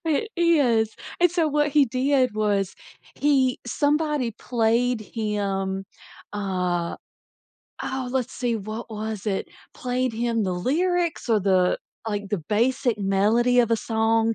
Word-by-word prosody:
It 325 +7 0
is, 265 -11 +3 0.3
and 355 0 +5
so 335 -2 +1
what 295 0 +2
he 290 -1 +4
did 255 -1 +1
was 205 -3 0 0.4
he 270 -2 +2
somebody 295 -4 +1
played 235 +1 +1
him, 195 -3 -2 0.5
uh 180 -4 -1 0.9
Oh, 260 -1 -3
let's 255 -1 -1
see, 240 -2 -1
what 215 +3 -6
was 215 -1 -5
it? 195 -2 -1 0.3
Played 250 -1 -1
him 230 -1 0
the 185 - -1
lyrics 335 - 0
or 220 -2 +3
the 185 -2 +3 0.3
like, 205 -2 -3
the 205 - -1
basic 240 +1 +1
melody 210 +5 +3
of 235 -1 +1
a 230 - +4
song, 225 0 +1
230 Hz, 135 wpm, -24 LUFS, 205-265 Hz, 0.9 s, and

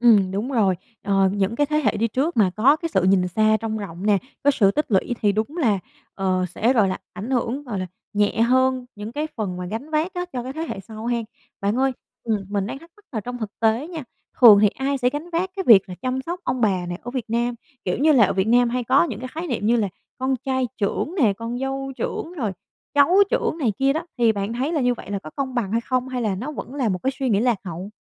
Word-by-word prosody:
Ừm, 210 -6 +5
đúng 210 +7 -2
rồi. 205 -7 +3 0.3
Ờ 195 -1 +3
những 200 +2 0
cái 290 - +2
thế 300 +1 0
hệ 295 - +1
đi 230 +2 +1
trước 270 +7 -1
mà 200 -4 +5
có 260 +7 +5
cái 330 +1 -4
sự 190 - +3
nhìn 185 -1 +3
xa 215 +4 +3
trông 220 -1 -3
rộng 195 -2 -6
nè, 210 -1 +4 0.3
có 285 - +5
sự 200 -7 +3
tích 300 +8 0
lũy 205 +5 +1
thì 205 -1 +4
đúng 220 - -2
là, 220 - +2 0.4
ờ, 185 -1 0
sẽ, 235 +4 +3
gọi 215 -6 +4
là, 185 - -2 0.2
ảnh 205 +7 -6
hưởng, 255 +2 -1
gọi 225 -8 -4
là 185 - -3 0.3
nhẹ 205 +2 +1
hơn 260 +1 +3
những 210 +2 -7
cái 300 +5 -2
phần 190 -5 -3
mà 180 - -4
gánh 225 +11 -5
vác 315 +4 0
á 355 0 -3
cho 245 -2 -3
cái 260 - -6
thế 315 - -5
hệ - - -4
sau 220 +2 -9
ha! 240 0 +1 0.4
Bạn 200 +2 +1
ơi, 265 +1 +2 0.3
ừm, 215 -4 -1
mình 200 -1 -1
đang 270 - -6
thắc 330 +3 -16
mắc 420 - -24
là 230 - -2
trong 245 +3 -6
thực 220 -3 -5
tế 230 +7 +2
nha, 330 -4 -6 0.4
thường 215 -5 +10
thì 210 - +7
ai 270 +6 -2
sẽ 250 -1 +2
gánh 295 +6 -6
vác 350 +2 -1
cái 385 - -2
việc 195 -4 +7
là 180 - -6
chăm 255 +1 -1
sóc 345 +6 -5
ông 250 0 -1
bà 190 -5 +2
này 175 0 -4
ở 245 - -6
Việt 255 -3 -3
Nam? 240 +1 0 0.3
Kiểu 180 - 0
như 305 +5 +4
là 255 -7 +6
ở - - -1
Việt 190 +2 +1
Nam 240 +1 +4
hay 250 +1 -1
có 260 +4 +4
những 240 -12 -4
cái 255 - -5
khái 330 +3 -5
niệm 235 -7 -2
như 235 +2 +4
là 215 -4 +1 0.3
con 260 +1 0
trai 260 -1 0
trưởng 225 - -1
nè, 215 -6 +4
con 230 +4 -5
dâu 270 0 -3
trưởng, 330 - -4
rồi 240 - -2 0.4
cháu 290 +5 +5
trưởng - - 0
này 260 -9 +1
kia 275 +1 +3
đó, 320 +2 -3
thì 235 -2 +4
bạn 205 +1 -3
thấy 260 +6 -1
là 310 -4 0
như 245 -1 +3
vậy 215 - -9
là 200 - -1
có 155 - -10
công 265 -2 -3
bằng 215 -6 -1
hay 230 +1 +1
không 255 +1 -1
hay 255 -1 -2
là 210 -4 0
nó 250 +10 -5
vẫn 280 -2 -7
là 260 -6 0
một 185 -2 -1
cái 265 - +2
suy 265 -2 0
nghĩ 200 -3 +3
lạc 240 -1 +2
hậu? 180 +1 -6
235 Hz, 275 wpm, -23 LUFS, 205-270 Hz, 0.4 s, thường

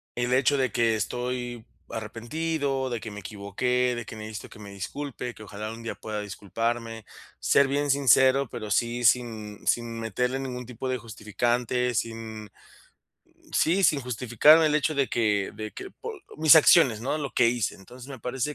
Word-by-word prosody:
el 125 +1 0
hecho 135 +2 +3
de 130 -1 +1
que 115 -3 +2
estoy 120 +2 -3 0.2
arrepentido, 135 +5 -2
de 120 -2 -3
que 110 - -7
me 105 - -7
equivoqué, 120 +6 -1
de 120 -1 -5
que - - -9
necesito 110 -1 -7
que - - -14
me 100 -1 -10
disculpe. 125 +5 -5
Que 110 - -11
ojalá, 105 +1 -6
un 115 +1 -9
día 115 - -4
pueda 105 -1 -5
disculparme. 115 +3 -4 0.3
Ser 140 - +4
bien 145 +1 +1
sincero, 135 -1 +4
pero 105 -1 -6
sí, 120 +4 0
sin 110 -3 +1
sin 115 -1 0
meterle 125 +4 -1
ningún 125 -2 -5
tipo 125 +2 -6
de 130 - 0
justificante, 120 +3 -1
sin 110 -2 -4 1.0
sí, 180 +5 +2
sin 150 -6 +4
justificarme, 125 +6 +4
el 150 - +1
hecho 155 +1 0
de 140 -2 +1
que 105 -4 +1
de 110 0 -6
que 385 - -8
por 460 - -8 0.2
Mis 155 0 +7
acciones, 145 -7 +6
¿no?, 135 +6 -1
lo 140 -3 -4
que 120 - +4
hice. 120 -3 -1
Entonces, 125 +7 -13
me 135 -2 -8
parece 130 +4 -3
120 Hz, 175 wpm, -26 LUFS, 110-135 Hz, 1.0 s, Mis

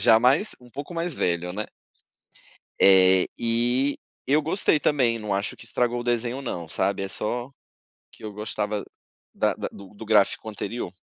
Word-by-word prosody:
já 110 - +6
mais 140 - +3
um 125 -1 -17
pouco 145 +7 -7
mais 170 0 -2
velho, 90 0 -1
né. 105 +3 -3 1.2
Eh. 95 -1 +6
E 120 +4 +1 0.3
eu 145 +3 +3
gostei 160 0 +3
também, 125 -6 +2
não 105 -2 -3
acho 100 +2 -2
que - - -12
estragou 120 0 0
o - - -7
desenho, 120 +2 -1
não, 85 - -5
sabe. 95 +4 0
É - - -3
só, 120 +6 -1 0.6
que - - -18
eu 105 - -5
gostava 105 0 -3 0.5
da - - +1
da - - -4
do 100 0 -13
do 110 +2 -10
gráfico 105 0 +2
anterior. 105 -2 -5
115 Hz, 170 wpm, -25 LUFS, 100-125 Hz, 1.2 s, já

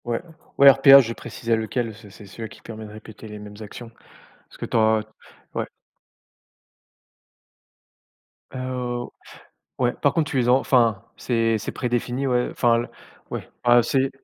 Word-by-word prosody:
Ouais, 120 -1 -1 0.4
ouais, 140 0 +9
RPA, 135 +1 +8
je 115 -3 0
précisais 115 0 -3
lequel. 115 +1 -3
C'est 110 -1 -15
c'est 100 +1 -14
celui-là 110 +4 -8
qui - - -15
permet 110 -1 -9
de 105 - -11
répéter 110 0 -12
les 105 0 -9
mêmes 105 +1 -11
actions, 115 +2 -10 0.6
parce - - -17
que - - -5
tu - - -1
as 110 -1 +3 0.5
ouais. - - -1 2.9
Heu, 130 - -5
au 120 -1 -4 0.7
ouais, 125 -1 +1
par 145 - 0
contre 155 -1 0
tu 135 - -1
les 125 -2 +1
as - - +5
enfin, 120 -5 +2
c'est 115 -2 0
c'est 105 - -5
prédéfini, 125 +2 -2
ouais, 125 -1 +1
enfin 120 -1 +2
le 120 - -2 0.4
ouais, - - -6
ah, 120 0 +6
c'est 135 +3 +1
120 Hz, 165 wpm, -23 LUFS, 110-125 Hz, 2.9 s, ouais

